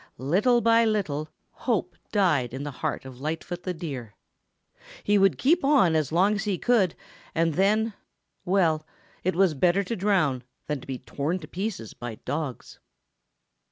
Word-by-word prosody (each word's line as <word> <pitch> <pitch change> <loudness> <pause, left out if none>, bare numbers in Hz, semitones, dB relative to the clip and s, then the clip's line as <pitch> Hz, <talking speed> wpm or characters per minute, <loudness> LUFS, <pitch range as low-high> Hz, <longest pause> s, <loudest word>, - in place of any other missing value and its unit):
Little 200 - +3
by 230 0 +5
little 170 -9 -1 0.2
hope 185 -8 -2 0.2
died 155 - +2
in 135 - -5
the 145 - -4
heart 130 - -3
of 130 -1 -10
Lightfoot 165 +4 -4
the 185 - -3
Deer. 135 -10 -6 0.9
He 205 0 +3
would 195 -8 +4
keep 320 - +3
on 275 - +5
just 160 - +3
as - - -13
long 190 +6 +4
as 210 0 -2
he 200 -3 0
could 210 -7 +2 0.4
and 165 0 +2
then, 215 +5 +2 0.5
well, 175 -5 +2 0.4
it 185 0 0
was 185 -2 +4
better 175 +7 +2
to 230 +5 -3
drown 180 - +1 0.2
than 150 -3 -3
to - - -13
be 135 -1 -3
torn 140 +7 -2
to 155 - -9
pieces 185 - -4
by 120 -2 -6
dogs. 145 -4 -4
175 Hz, 165 wpm, -26 LUFS, 145-205 Hz, 0.9 s, by